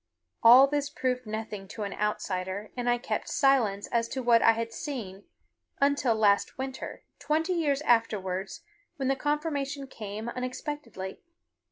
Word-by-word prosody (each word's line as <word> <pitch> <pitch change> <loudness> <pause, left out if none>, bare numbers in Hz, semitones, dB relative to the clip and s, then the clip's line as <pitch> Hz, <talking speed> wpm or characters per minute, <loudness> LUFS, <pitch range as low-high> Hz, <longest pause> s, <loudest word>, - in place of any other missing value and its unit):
All 245 +4 +9
this 285 0 -1
proved 255 -4 -2
nothing 215 -2 -5
to 215 - -6
an 200 - -4
outsider, 205 -1 -2
and 245 -1 -1
I 240 - +3
kept 240 - -3
silence 235 -8 +2
as 230 -1 +1
to 260 +1 -4
what 235 -1 +5
I 225 - +6
had 230 0 -4
seen 220 -9 -6 0.5
until 280 -4 +2
last 205 -2 +2
winter, 265 0 -6 0.2
twenty 320 +5 0
years 300 -4 0
afterwards, 195 -6 0 0.3
when 270 -2 -1
the 270 - +3
confirmation 285 -1 -2
came 215 -3 -7
unexpectedly. 255 -5 -5
240 Hz, 145 wpm, -28 LUFS, 210-275 Hz, 0.5 s, All